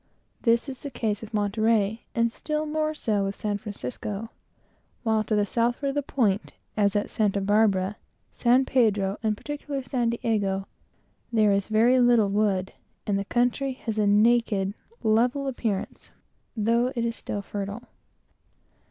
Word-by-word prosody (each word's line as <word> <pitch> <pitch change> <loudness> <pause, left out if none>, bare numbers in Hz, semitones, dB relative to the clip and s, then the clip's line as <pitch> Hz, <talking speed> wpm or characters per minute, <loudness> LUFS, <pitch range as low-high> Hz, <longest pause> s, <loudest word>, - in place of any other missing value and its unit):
This 235 +2 +2
is 260 -2 -7
the 285 - -5
case 220 -5 -2
with 220 0 -9
Monterey, 215 +1 +1
and 230 0 +2
still 305 +4 -3
more 310 0 -1
so 210 -8 0
with 195 0 -3
San 205 -1 -2
Francisco; 205 - -5 0.7
while 220 -2 +2
to 215 0 -1
the 205 -1 +2
southward 240 +6 0
of - - -2
the 290 - 0
point, 220 -7 0 0.2
as 205 -1 +2
at 205 - +1
Santa 205 -2 0
Barbara, 200 -1 +2 0.3
San 250 +2 +3
Pedro, 210 -6 +2
and 215 -2 0
particularly 290 0 -5
San 240 -1 0
Diego, 205 -4 -1 0.7
there 215 -3 +4
is 200 -1 0
very 230 +4 +4
little 240 -4 +4
wood, 195 -2 0 0.3
and 200 -1 0
the 200 - -3
country 250 +4 +1
has 225 -3 -4
a 210 - +3
naked, 210 -2 +3 0.3
level 245 +6 +2
appearance, 225 -7 -3 0.5
though 230 +3 +2
it 235 -1 0
is 230 0 -2
still 205 - -4
very 200 0 -4
fertile. 210 +4 -7
220 Hz, 155 wpm, -26 LUFS, 205-240 Hz, 0.7 s, there